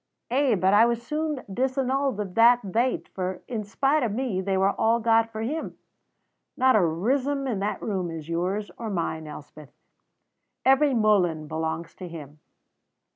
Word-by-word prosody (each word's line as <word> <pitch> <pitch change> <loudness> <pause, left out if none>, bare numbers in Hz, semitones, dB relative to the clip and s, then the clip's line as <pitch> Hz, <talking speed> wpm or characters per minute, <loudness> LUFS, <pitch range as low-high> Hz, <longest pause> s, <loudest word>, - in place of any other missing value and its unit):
Ay; 265 -2 +3
but 190 +1 +2
I 220 +3 +6
was 235 -1 0
soon 300 0 -3
disannulled 260 +2 -1
o' - - +1
that 230 +5 +4
thait, 245 +3 0
for, 185 -1 -4
in 225 -4 -3
spite 275 +9 +1
of 235 -5 0
me, 220 -4 -2
they 190 0 -1
were 195 +1 +3
all 230 +3 +2
got 225 0 +3
for 220 - -5
him. 305 +8 -4 0.8
Not 260 -1 +4
a - - +6
rissom 255 - 0
in 235 -7 -2
that 205 +2 -3
room 190 -5 -2
is 160 -2 -7
yours 180 +4 -2
or 230 -2 -4
mine, 165 -4 -3
Elspeth; 150 -1 -11 1.0
every 270 +1 +4
muhlen 180 -8 +2
belongs 160 +1 -4
to 185 - -7
him." 150 -3 -10
215 Hz, 165 wpm, -25 LUFS, 180-255 Hz, 1.0 s, I